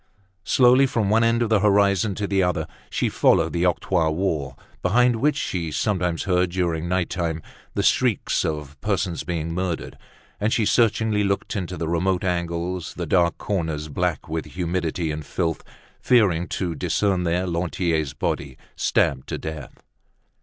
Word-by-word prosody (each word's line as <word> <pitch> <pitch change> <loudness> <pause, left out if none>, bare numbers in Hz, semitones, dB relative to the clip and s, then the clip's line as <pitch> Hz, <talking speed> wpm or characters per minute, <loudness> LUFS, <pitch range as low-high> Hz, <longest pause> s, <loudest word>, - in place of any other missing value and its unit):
Slowly, 130 +2 +5
from 110 -5 0
one 115 +1 +4
end 115 +1 +3
of 115 - -1
the 110 -2 +4
horizon 100 -1 +3
to 105 - -2
the 100 -1 +1
other, 90 -3 0 0.2
she - - 0
followed - - +3
the 85 +1 +2
octroi 85 -2 +1
wall, 80 -6 -2 0.2
behind 120 +5 +3
which 145 +6 +2
she 85 -3 -2
sometimes 90 -2 0
heard, 90 -1 +1
during 85 -2 -1
night 90 -1 +1
time, 80 -3 -2 0.3
the - - 0
shrieks - - +2
of 75 -2 -4
persons 95 -6 -1
being 80 -1 -3
murdered; 90 -1 -3 0.4
and 105 +2 0
she 115 - +2
searchingly 110 -2 +2
looked 100 +2 -1
into 90 -2 -3
the 80 - -3
remote 90 +3 0
angles, 85 -1 -2
the 90 - -3
dark 85 +1 +2
corners, 80 -6 -2
black 90 +2 -2
with 80 0 -3
humidity 85 -2 -2
and 75 0 -5
filth, 80 +2 -2 0.4
fearing 95 -9 +3
to 90 -3 -2
discern 95 +2 0
there 90 +2 0
Lantier's 85 -4 -1
body, 70 -2 -3 0.2
stabbed 65 -1 +1
to - - -2
death. 80 -3 -8
90 Hz, 160 wpm, -23 LUFS, 80-100 Hz, 0.4 s, Slowly